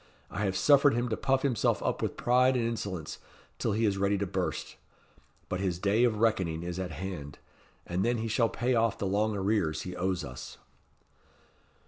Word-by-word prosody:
I 105 - -2
have 95 -1 0
suffered 145 -2 +5
him 120 +1 0
to 110 - 0
puff 135 +1 +1
himself 125 -6 +1
up - - -1
with - - -2
pride 125 +2 +3
and 120 - 0
insolence, 100 -8 -4 0.4
till - - 0
he 110 +2 +1
is 100 -2 +1
ready 100 +1 +2
to 100 - -1
burst. 90 - -3 0.7
But 90 - -3
his 95 -3 -1
day 100 +6 +3
of 110 -3 +1
reckoning 95 -7 +1
is 90 +1 -4
at 95 -1 -3
hand, 80 -5 -6 0.5
and 90 +2 -1
then 120 +1 +1
he 115 0 -2
shall 115 +1 +2
pay 125 +2 0
off 115 -2 +2
the - - -3
long 105 +2 +1
arrears 95 -5 0
he 90 -1 -6
owes 90 -1 -1
us." 60 -1 -9
100 Hz, 190 wpm, -29 LUFS, 90-115 Hz, 0.7 s, suffered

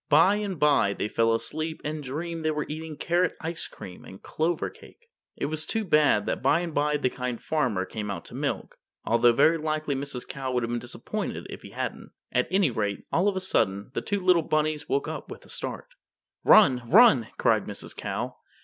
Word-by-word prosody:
By 175 +7 +5
and 200 -4 -3
by 140 -9 +4
they 105 - -2
fell 115 +1 +2
asleep 155 +7 -2
and 155 0 -3
dreamed 160 +5 -4
they 155 - +1
were 150 -1 -1
eating 155 0 -6
carrot 175 +1 +1
ice 165 0 -4
cream 90 -1 -11
and 95 - -11
clover 160 +2 -1
cake. 470 -1 -18 0.2
It - - -3
was 155 +2 -2
too 220 -1 -1
bad 150 - +4
that - - -2
by 145 +6 +3
and 170 -2 -4
by 150 +1 +1
the 130 -3 0
Kind 125 -2 -4
Farmer 120 -12 0
came 105 +1 -5
out 95 -4 -5
to - - -11
milk, - - -3 0.3
although 120 +1 +5
very 155 +7 +4
likely 155 -1 -1
Mrs. 135 -2 -5
Cow 135 -1 -4
would 125 -1 +1
have 115 - -2
been 120 - -1
disappointed 120 +1 -5
if - - -8
he - - -11
hadn't. - - -5 0.2
At 125 - +1
any 185 -5 +3
rate, 105 -3 -2
all 180 +4 +2
of 200 - +1
a - - 0
sudden, 100 - 0
the - - -2
two 205 -1 -1
little 180 -2 +5
rabbits 155 0 0
woke 410 0 0
up - - -6
with - - -10
a - - -18
start. - - -5 0.5
"Run, 130 -12 +6
run!" 165 - +7
cried - - +2
Mrs. - - -8
Cow. - - -4
150 Hz, 210 wpm, -27 LUFS, 120-165 Hz, 0.5 s, run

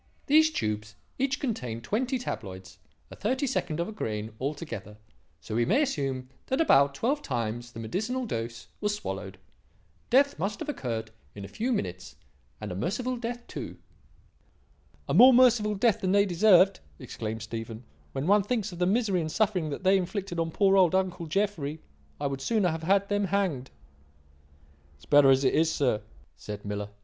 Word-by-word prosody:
These 315 +2 +5
tubes 105 - -3 0.2
each 275 +2 0
contained 125 - -3
twenty 250 - -1
tabloids, 95 - -7 0.3
a - - -8
thirty 260 +7 -1
second 180 - -2
of 170 - -1
a - - -6
grain 110 - -4
altogether, 130 - -5 0.4
so - - -8
we 120 +2 +2
may 270 - +3
assume 135 - -2 0.2
that 265 - 0
about 140 - +4
twelve 270 - 0
times 120 - -3
the 115 - -8
medicinal 220 - -2
dose 115 - -5
was 210 0 0
swallowed. 210 - -6 0.7
Death 280 +3 +3
must 200 +4 -2
have 315 - -5
occurred 115 - -4 0.2
in 100 -1 -7
a - - -8
few 235 - -2
minutes, 90 - -3 0.4
and - - -6
a - - -4
merciful 225 - -2
death 240 0 -5
too." - - -7 1.3
"A - - -1
more 255 0 +8
merciful 235 -4 +4
death 220 +1 +2
than 190 -1 +1
they 200 0 +5
deserved," 190 +1 +5 0.2
exclaimed 110 0 -6
Stephen, 115 +1 -6 0.3
"when 135 +1 -3
one 205 +3 +5
thinks 215 -1 -2
of 175 - -9
the 180 - +2
misery 200 -3 +1
and 155 -1 -3
suffering 190 -6 +1
that 145 - -5
they 190 +1 +5
inflicted 190 -1 -3
on 165 0 0
poor 195 +3 +3
old 185 -2 +4
uncle 180 -3 -1
Jeffrey. 160 -5 -1 0.4
I - - -3
would 135 -1 -2
sooner 215 -2 +1
have 160 0 -3
had 195 +4 +2
them 205 0 0
hanged." 180 -9 -1 1.3
"It's 70 0 -20
better 145 - +6
as 135 +1 +4
it 130 - +3
is, 160 +1 +3
sir," 125 -9 +1 0.4
said 105 -1 -8
Miller. 105 0 -4
180 Hz, 175 wpm, -28 LUFS, -, 1.3 s, more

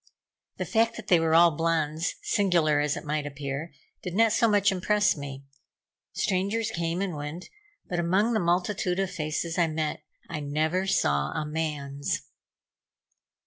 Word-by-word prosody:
The - - -2
fact 230 +1 +2
that 220 -3 -8
they 175 - +6
were 165 0 +2
all 170 0 +7
blondes, 160 0 0
singular 170 -7 +2
as 150 0 0
it - - -7
might 150 0 -1
appear, 145 +2 -5 0.3
did 180 -1 -5
not 225 +1 +4
so 230 - +4
much 205 -2 +4
impress 205 +3 +2
me. 140 -2 -7 0.7
Strangers 200 +4 0
came 170 0 -1
and 185 -5 -3
went, 150 +4 -6 0.4
but 175 - -2
among 190 +7 +2
the 220 - +2
multitude 180 +1 0
of 195 -1 0
faces 165 0 -2
I 170 - +4
met, 155 -1 -2 0.3
I 150 - -4
never 155 +6 0
saw 70 - +1
a 155 - -2
man's. 150 -3 -3
165 Hz, 155 wpm, -27 LUFS, 150-190 Hz, 0.7 s, all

